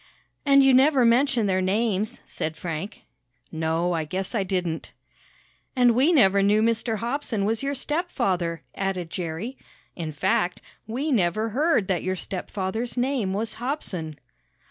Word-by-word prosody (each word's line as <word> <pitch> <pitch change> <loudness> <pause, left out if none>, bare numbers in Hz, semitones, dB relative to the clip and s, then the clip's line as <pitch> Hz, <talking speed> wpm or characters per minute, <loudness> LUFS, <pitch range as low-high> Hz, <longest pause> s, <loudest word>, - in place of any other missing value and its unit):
"And 275 0 +7
you 270 -1 +5
never 265 0 +5
mentioned 240 -1 +3
their 185 -1 +1
names," 210 +2 0
said 160 0 -4
Frank. 170 +5 -5 0.5
"No, 160 +2 0
I 165 -1 0
guess 185 +7 -4
I 225 - +1
didn't." 180 -4 -3 0.8
"And 245 -2 +5
we 260 +8 +3
never 200 - +5
knew 205 +2 +3
Mr. 230 0 0
Hobson 235 -3 -2
was 220 +1 0
your 280 +1 -2
stepfather," 240 - -1
added 185 -4 -3
Jerry. 180 +9 -4 0.4
"In 165 -3 -4
fact, 175 +4 0 0.3
we 265 +7 -2
never 215 0 +1
heard 270 - +2
that 185 -3 0
your 185 0 -1
stepfather's 195 +6 -4
name 245 -6 0
was 220 +3 -3
Hobson." 185 - -4
210 Hz, 145 wpm, -25 LUFS, 180-250 Hz, 0.8 s, And